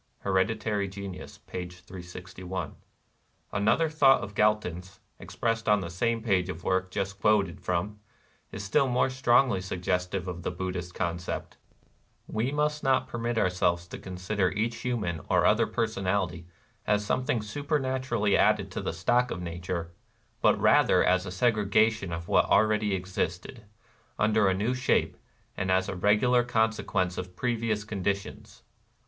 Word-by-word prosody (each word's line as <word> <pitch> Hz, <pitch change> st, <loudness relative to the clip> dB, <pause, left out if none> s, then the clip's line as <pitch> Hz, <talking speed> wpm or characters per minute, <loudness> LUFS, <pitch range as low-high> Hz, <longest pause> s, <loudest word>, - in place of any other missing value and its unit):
(Hereditary 100 Hz, +1 st, 0 dB
Genius, 95 Hz, -1 st, -8 dB
p. 90 Hz, -1 st, -6 dB
361.) 90 Hz, 0 st, -8 dB, 0.8 s
Another 110 Hz, +10 st, +2 dB
thought 145 Hz, -4 st, +4 dB
of 100 Hz, -, -7 dB
Gal 105 Hz, +1 st, +4 dB
ton's, 90 Hz, -2 st, -8 dB, 0.2 s
expressed 115 Hz, -1 st, -2 dB
on 105 Hz, -1 st, +4 dB
the 85 Hz, -2 st, -5 dB
same 115 Hz, +5 st, -1 dB
page 95 Hz, -5 st, +1 dB
of 85 Hz, -2 st, -5 dB
the -, -, -17 dB
work 95 Hz, 0 st, +1 dB
just 100 Hz, +1 st, -3 dB
quoted 100 Hz, -5 st, +2 dB
from, 90 Hz, +4 st, -2 dB, 0.5 s
is 100 Hz, -, -6 dB
still 135 Hz, +7 st, +2 dB
more 125 Hz, +1 st, +1 dB
strongly 125 Hz, -4 st, +3 dB
suggestive 90 Hz, 0 st, -2 dB
of 90 Hz, -1 st, -5 dB
the -, -, -2 dB
Buddhist 90 Hz, -1 st, -5 dB
concept: 85 Hz, -1 st, -4 dB, 0.2 s
— -, -, -36 dB
" -, -, -41 dB
We 120 Hz, +5 st, +1 dB
must 150 Hz, +1 st, 0 dB
not 130 Hz, -1 st, +2 dB
permit 120 Hz, 0 st, -3 dB
oxirselves 90 Hz, -3 st, +1 dB
to -, -, -7 dB
consider 95 Hz, +1 st, -1 dB
each 115 Hz, +5 st, -2 dB
human 105 Hz, -10 st, -2 dB
or -, -, +3 dB
other -, -, +4 dB
personality 95 Hz, -6 st, -1 dB, 0.4 s
as 105 Hz, 0 st, +2 dB
something 125 Hz, 0 st, 0 dB
supernatu 130 Hz, +2 st, -2 dB
rally 105 Hz, -4 st, +2 dB
added -, -, +3 dB
to -, -, -4 dB
the -, -, -3 dB
stock 120 Hz, +9 st, +2 dB
of 90 Hz, -, -4 dB
nature, 85 Hz, 0 st, -4 dB, 0.5 s
but -, -, +4 dB
rather -, -, +4 dB
as 95 Hz, +1 st, +2 dB
a -, -, -3 dB
segrega 110 Hz, +1 st, +3 dB
tion 100 Hz, -5 st, -6 dB
of 85 Hz, 0 st, -5 dB
what -, -, +4 dB
already 105 Hz, 0 st, +3 dB
existed, 95 Hz, +4 st, -4 dB, 0.5 s
under 110 Hz, -1 st, +3 dB
a 95 Hz, -, +2 dB
new 110 Hz, +6 st, 0 dB
shape, 125 Hz, +1 st, +1 dB, 0.4 s
and 95 Hz, -, -2 dB
as 95 Hz, 0 st, +2 dB
a 100 Hz, -, -4 dB
regular 105 Hz, +6 st, +3 dB
consequence 110 Hz, -6 st, 0 dB
of 90 Hz, 0 st, -7 dB
previous 115 Hz, -3 st, -1 dB
conditions. 100 Hz, -1 st, -4 dB
100 Hz, 155 wpm, -28 LUFS, 90-115 Hz, 0.8 s, thought